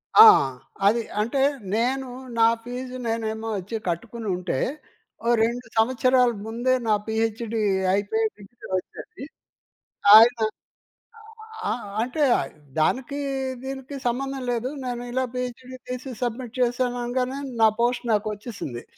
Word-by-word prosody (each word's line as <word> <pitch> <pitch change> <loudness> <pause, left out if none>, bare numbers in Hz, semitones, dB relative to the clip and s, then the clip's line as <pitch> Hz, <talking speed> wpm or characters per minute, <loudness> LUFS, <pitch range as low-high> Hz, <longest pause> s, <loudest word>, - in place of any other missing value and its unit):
ఆ! 435 - +12 0.6
అది. 230 +3 +3 0.2
అంటే 235 +5 0 0.3
నేను 260 +4 0 0.3
నా 225 - +7 0.2
ఫీజు 250 +1 -6
నేనేమో 225 0 -2
వచ్చి 195 +4 -5
కట్టుకుని 220 +6 -4
ఉంటే 180 -5 -2 0.7
ఓ - - 0 0.2
2 235 +1 -1
సంవత్సరాల 250 +2 +4 0.2
ముందే 240 +3 0
నా 215 - +4
పీహెచ్‌డీ 225 0 -1 0.3
అయిపోయే 205 +3 +1
డిగ్రీ 210 +4 -13
వచ్చేది. 275 - -8 0.9
ఆయన 235 +2 +8 1.3
ఆ! - - +1 0.3
అంటే 255 +5 -1 0.6
దానికి 265 - 0 0.4
దీనికి 270 +1 -6
సంబంధం 270 +2 -2
లేదు. 240 +1 -1 0.2
నేను 245 -1 -3
ఇలా 260 +1 0
పీహెచ్‌డీ 250 +1 -5
తీసి 255 +1 -5
సబ్మిట్ 245 0 -4
చేశాను 245 0 +1
అనగానే 250 +2 -1 0.2
నా 220 - +8
పోస్ట్ 245 +1 +1
నాకు 210 +1 +1
వచ్చేసింది. 205 - -7
240 Hz, 115 wpm, -24 LUFS, 220-255 Hz, 1.3 s, ఆ